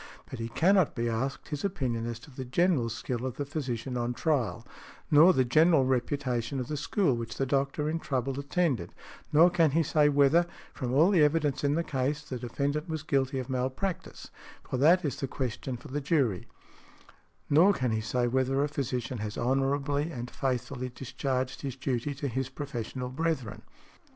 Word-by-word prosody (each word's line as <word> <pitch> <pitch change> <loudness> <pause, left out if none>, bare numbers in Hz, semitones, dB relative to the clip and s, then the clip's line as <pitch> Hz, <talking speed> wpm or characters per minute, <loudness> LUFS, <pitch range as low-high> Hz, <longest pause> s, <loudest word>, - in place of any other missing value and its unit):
But 130 - -6
he 115 0 -3
cannot 185 +6 +3
be 120 -2 -1
asked 125 +4 -3
his 150 -2 -4
opinion 130 - -1
as 120 -1 -4
to 145 - -14
the 130 0 -6
general 135 -1 +1
skill 120 +1 -4
of 130 -2 -4
the 145 - -2
physician 130 -4 -4
on 120 0 -2
trial; 125 -7 0 0.5
nor 155 +5 +8
the 130 -7 +2
general 155 +2 +4
reputation 130 -1 -1
of 125 - -4
the 150 - -2
school 150 - +1
which 115 -1 -5
the 135 - +1
doctor 140 +2 0
in 160 +2 -1
trouble 135 -2 -2
attended; 140 - -1 0.4
nor 165 +4 +6
can 165 -3 +4
he 165 - +4
say 150 0 +3
whether, 145 +4 +4 0.3
from 125 -4 -3
all 155 +9 +5
the 180 -5 +4
evidence 150 -2 +1
in 145 +1 +2
the 170 - +1
case, 145 0 -1
the 130 -4 -6
defendant 140 +6 -2
was 160 -2 -3
guilty 135 -3 0
of 130 -2 -3
malpractice, 130 +8 -3 0.4
for - - -2
that 165 +6 +5
is 140 - -2
the 135 - -2
question 130 -1 -4
for - - -12
the 145 +3 -2
jury; 135 - +1 1.0
nor 165 +7 +6
can 130 - -1
he 110 0 0
say 120 +2 0
whether 130 +2 +1
a - - +1
physician 130 -4 -3
has 105 0 -4
honorably 140 +4 0
and 120 -4 -6
faithfully 130 -1 -2
discharged 130 0 -3
his 135 -3 -4
duty 135 +1 -2
to 140 +1 -3
his 130 +1 -2
professional 130 -2 -5
brethren. 135 -5 -2
135 Hz, 185 wpm, -29 LUFS, 125-150 Hz, 1.0 s, nor